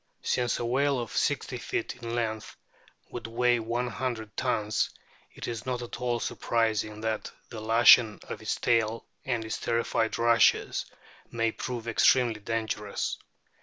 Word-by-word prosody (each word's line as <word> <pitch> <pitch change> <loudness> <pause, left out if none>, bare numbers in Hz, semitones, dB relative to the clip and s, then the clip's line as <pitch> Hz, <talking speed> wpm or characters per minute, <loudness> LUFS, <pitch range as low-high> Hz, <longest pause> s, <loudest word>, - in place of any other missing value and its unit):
Since 125 -1 +1
a 120 - -2
whale 135 +3 +2
of 120 -2 -5
60 - - 0
feet - - -3
in 115 0 -4
length 110 -2 -3 0.6
would 115 -2 -6
weigh 120 +1 +2
one 120 +2 -1
hundred 115 -3 -4
tons, 105 0 0 0.5
it - - -6
is 115 -1 -4
not 125 -1 -2
at 120 +1 -8
all 120 -1 0
surprising 110 -2 -1
that 110 -1 -2 0.2
the 110 -3 -7
lashing 115 0 +6
of - - -7
its - - -1
tail 115 -1 +1 0.2
and 120 -5 -1
its 110 - -3
terrified 115 -1 0
rushes 115 0 +3 0.4
may 115 -1 0
prove 120 -1 -5
extremely 115 0 +3
dangerous. 110 -1 -2
115 Hz, 145 wpm, -28 LUFS, 110-120 Hz, 0.6 s, lashing